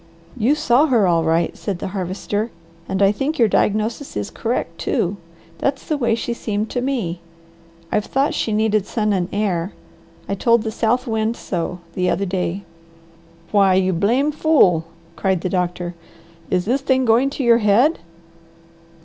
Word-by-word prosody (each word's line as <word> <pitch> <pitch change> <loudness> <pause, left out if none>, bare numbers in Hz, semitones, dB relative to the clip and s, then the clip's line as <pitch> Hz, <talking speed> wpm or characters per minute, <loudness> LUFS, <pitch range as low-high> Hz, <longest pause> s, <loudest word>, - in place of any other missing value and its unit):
"You 255 +4 +2
saw 300 -1 +3
her 235 -7 +3
all 170 -2 +2
right!" 165 +1 +1
said 200 -4 -4
the 180 - -5
Harvester, 200 +3 -3 0.4
"and 190 +1 +1
I 195 - +5
think 275 +9 -2
your 230 - +5
diagnosis 215 +7 0
is 105 - -4
correct 170 -8 -3
too. 185 +3 -1 0.4
That's 275 -1 -1
the 310 - 0
way 235 -5 +1
she 235 +1 -3
seemed 215 -2 -3
to 245 - -1
me. 230 -11 -2 0.7
I've 210 0 +1
thought 275 +2 +1
she 225 - -1
needed 215 -1 +1
sun 215 -2 0
and 180 -2 -1
air. 195 -3 -1 0.5
I - - -2
told 230 +3 +2
the 220 - -3
South 235 +3 0
Wind 220 -1 -1
so 175 0 -4
the 180 0 0
other 200 - 0
day." 185 0 -2 0.9
"Why 195 -3 +4
you 190 0 +2
blame 235 - +2
fool!" 270 - +3 0.3
cried 190 -3 0
the 185 - -2
doctor. 180 -1 -2 0.6
"Is 180 -1 0
this 255 +6 +1
thing 260 -1 +2
going 235 +4 +4
to 275 -1 -4
your 235 -1 +5
head? 235 +9 +3
210 Hz, 165 wpm, -20 LUFS, 185-245 Hz, 0.9 s, I